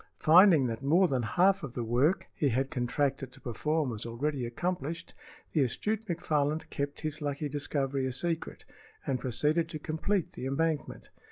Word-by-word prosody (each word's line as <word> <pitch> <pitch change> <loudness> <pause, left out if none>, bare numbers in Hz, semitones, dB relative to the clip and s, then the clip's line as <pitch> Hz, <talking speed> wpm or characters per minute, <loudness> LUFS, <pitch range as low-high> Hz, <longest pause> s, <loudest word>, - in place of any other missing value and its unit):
Finding 165 -3 +7
that 115 -1 -3
more 170 +7 +4
than 130 -5 0
half 185 - +3
of 135 -6 -7
the 120 - -2
work 125 +10 +2
he 145 - +1
had 130 +3 0
contracted 135 +1 -1
to 135 - -16
perform 150 +3 -1
was 110 -2 -5
already 125 +2 -2
accomplished, 165 +4 -3 0.4
the 155 - +3
astute 215 - -1
McFarland 155 -3 0
kept 140 0 -3
his 155 -1 -3
lucky 145 +1 -2
discovery 140 -2 -1
a - - -2
secret 165 +5 -3 0.4
and 130 -2 0
proceeded 150 +7 0
to 155 - -4
complete 160 +5 -1
the 130 - -5
embankment. 150 +1 -2
145 Hz, 165 wpm, -30 LUFS, 130-165 Hz, 0.4 s, Finding